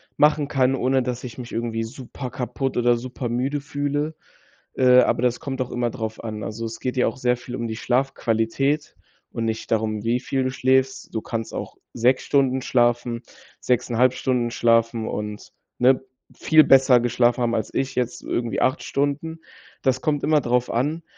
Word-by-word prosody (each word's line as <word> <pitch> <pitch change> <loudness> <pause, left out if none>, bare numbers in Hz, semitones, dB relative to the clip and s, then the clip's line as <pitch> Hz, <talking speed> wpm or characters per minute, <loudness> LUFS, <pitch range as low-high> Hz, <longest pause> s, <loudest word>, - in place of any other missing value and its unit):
machen 150 -1 +3
kann, 135 -2 +2
ohne 130 0 +1
dass 125 0 -4
ich 125 0 -8
mich 125 -1 -8
irgendwie 115 -1 -2
super 125 +2 -7
kaputt 125 +2 -3
oder 120 0 +4
super 125 0 -5
müde 130 +5 -1
fühle. 145 +1 -2 0.6
Äh, 125 -1 +6
aber - - +1
das 125 -1 +1
kommt 135 -2 -4
auch 125 - -3
immer 120 -1 -1
drauf 110 0 -5
an. 110 -2 -5
Also, 115 +2 -5
es 115 - -6
geht 130 0 -3
ja 125 - +3
auch - - -3
sehr 125 -1 +1
viel 125 0 -8
um 120 -2 -3
die 110 - -4
Schlafqualität 130 +2 0 0.4
und 115 - -3
nicht 110 0 -3
darum, 110 -1 0
wie 120 +2 +1
viel 135 +1 -1
du 130 - -1
schläfst. 130 0 +1
Du 110 - -2
kannst 115 -1 -5
auch - - -6 0.2
6 125 +3 +2
Stunden 130 -2 +2
schlafen, 120 -1 +1 0.4
6,5 125 0 +2
Stunden 125 -2 -1
schlafen 115 -1 +2
und, 105 0 -5 0.3
ne, 130 +1 +4 0.3
viel 155 -1 +5
besser 130 -3 +6
geschlafen 120 +1 +2
haben, 115 - +1
als 110 - -2
ich 135 0 -1
jetzt 125 -1 -2
irgendwie 120 -1 -2
8 130 -1 +1
Stunden. 145 +4 -2 0.4
Das 130 -1 +1
kommt 145 -2 0
immer 155 -1 +3
drauf 125 0 0
an. 150 +8 -1
125 Hz, 180 wpm, -23 LUFS, 115-135 Hz, 0.6 s, Äh